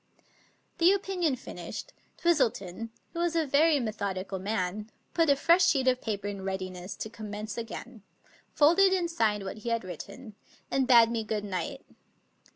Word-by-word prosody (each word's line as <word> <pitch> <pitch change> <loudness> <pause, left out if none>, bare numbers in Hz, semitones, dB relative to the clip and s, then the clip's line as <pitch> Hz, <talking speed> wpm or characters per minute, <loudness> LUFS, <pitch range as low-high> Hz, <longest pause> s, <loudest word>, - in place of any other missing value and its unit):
The 345 +2 +6
opinion 370 -7 0
finished, 255 - -8 0.2
Twistleton, 230 - 0 0.2
who 335 - -4
was 340 -1 0
a 325 -1 +2
very 295 +2 +4
me 230 -4 -1
thodical 195 -2 -4
man, 205 +1 -2 0.2
put 330 -2 +3
a 280 - +6
fresh 340 +6 +4
sheet 270 -6 +2
of 255 0 +3
paper 205 -2 -3
in 200 -1 -5
readiness 185 -1 -4
to - - -5
commence 210 -1 -6
again, 235 0 -7 0.5
folded 360 +6 +5
and 350 -3 0
signed 210 -8 +1
what 190 +2 -6
he 235 - -4
had 230 -2 0
written, 210 - -9 0.4
and 265 -1 +1
bade 235 -2 +7
me 230 -1 -1
good 210 -1 -3
night. 185 -4 -4
230 Hz, 160 wpm, -29 LUFS, 205-310 Hz, 0.5 s, bade